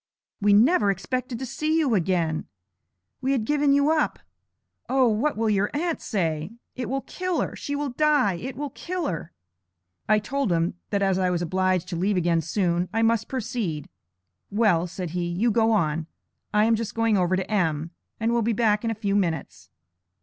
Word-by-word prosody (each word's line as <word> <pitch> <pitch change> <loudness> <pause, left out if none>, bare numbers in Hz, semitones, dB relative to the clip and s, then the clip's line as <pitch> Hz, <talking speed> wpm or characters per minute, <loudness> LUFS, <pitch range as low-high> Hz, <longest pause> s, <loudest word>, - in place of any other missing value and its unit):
We 205 0 +4
never 215 - +5
expected 250 +6 -2
to 260 - -4
see 305 +5 -1
you 295 -7 +2
again! 170 -4 0 0.7
We 265 +1 +1
had 235 -5 0
given 290 +2 +2
you 285 +2 +4
up; 315 -2 +1 0.7
O, 260 -1 +4
what 230 +6 +1
will 225 0 +1
your 205 -1 +2
aunt 335 +2 -1
say? 165 -2 -2 0.2
It 250 -2 -4
will 270 +1 -1
kill 365 +1 -3
her! - - -3
She 285 - -4
will 285 -2 -2
die! 290 -6 +3
It 245 +9 -6
will 285 +1 -4
kill 360 +4 -4
her.' 165 -1 -4 0.8
I 215 - +6
told 255 +2 -1
him, 165 0 +1 0.2
that 200 -1 0
as 190 -1 +2
I 185 -1 +2
was 175 -1 0
obliged 185 0 0
to - - -3
leave 190 +3 +1
again 170 -1 +2
soon, 175 +1 0
I 225 +2 +1
must 225 -1 +2
proceed. 225 - -3 0.6
'Well,' 200 -5 +2
said 180 -1 -5
he, 175 0 -2
'you 195 +8 +1
go 225 +1 +3
on; 160 -6 +1 0.4
I 210 0 +4
am 230 - +3
just 220 -1 -2
going 225 -1 +2
over 185 -1 +2
to 190 +2 -3
M., 165 -5 0 0.3
and 225 +1 +1
will 235 0 +2
be 230 +1 +1
back 210 -1 +2
in 230 - 0
a 225 - -1
few 200 -2 -1
minutes.' 150 - -2
210 Hz, 195 wpm, -25 LUFS, 180-255 Hz, 0.8 s, I